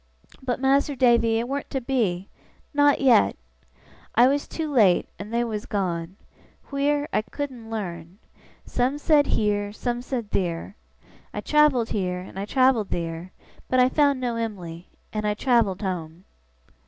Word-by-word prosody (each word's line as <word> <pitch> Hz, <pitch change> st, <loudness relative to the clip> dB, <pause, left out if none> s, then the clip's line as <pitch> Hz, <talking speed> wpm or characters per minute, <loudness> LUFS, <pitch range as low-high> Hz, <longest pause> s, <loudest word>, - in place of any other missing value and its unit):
But, 255 Hz, -1 st, -2 dB
Mas'r 275 Hz, +2 st, +2 dB
Davy, 235 Hz, -3 st, +4 dB
it 235 Hz, +1 st, -1 dB
warn't 280 Hz, +2 st, -4 dB
to 270 Hz, -, -2 dB
be 220 Hz, -8 st, -1 dB, 0.5 s
not 290 Hz, -1 st, +4 dB
yet! 170 Hz, -, +5 dB, 0.8 s
I 240 Hz, +2 st, +7 dB
was 280 Hz, +2 st, 0 dB
too 310 Hz, -3 st, -4 dB
late, 200 Hz, -8 st, +4 dB
and 205 Hz, +2 st, -7 dB
they 235 Hz, +1 st, +1 dB
was 220 Hz, -3 st, -4 dB
gone. 180 Hz, -3 st, -2 dB, 0.6 s
Wheer, 290 Hz, +1 st, +1 dB
I -, -, +3 dB
couldn't 250 Hz, -1 st, -6 dB
learn. 180 Hz, -5 st, -6 dB, 0.5 s
Some 255 Hz, +3 st, 0 dB
said 295 Hz, -1 st, +3 dB
heer, 205 Hz, -1 st, 0 dB
some 240 Hz, +3 st, -3 dB
said 245 Hz, -4 st, -4 dB
theer. 175 Hz, +1 st, -2 dB, 0.6 s
I -, -, -2 dB
travelled 300 Hz, -6 st, +3 dB
heer, 180 Hz, -3 st, -1 dB
and 190 Hz, +1 st, -9 dB
I 200 Hz, -, -3 dB
travelled 255 Hz, -3 st, +2 dB
theer, 170 Hz, +1 st, -4 dB, 0.4 s
but 255 Hz, -, +3 dB
I 250 Hz, 0 st, +5 dB
found 285 Hz, -1 st, +2 dB
no 240 Hz, -2 st, -2 dB
Em'ly, 180 Hz, -7 st, -5 dB, 0.3 s
and 215 Hz, 0 st, -1 dB
I 210 Hz, -, 0 dB
travelled 225 Hz, -5 st, +1 dB
home. 175 Hz, -1 st, -4 dB
230 Hz, 155 wpm, -24 LUFS, 190-265 Hz, 0.8 s, I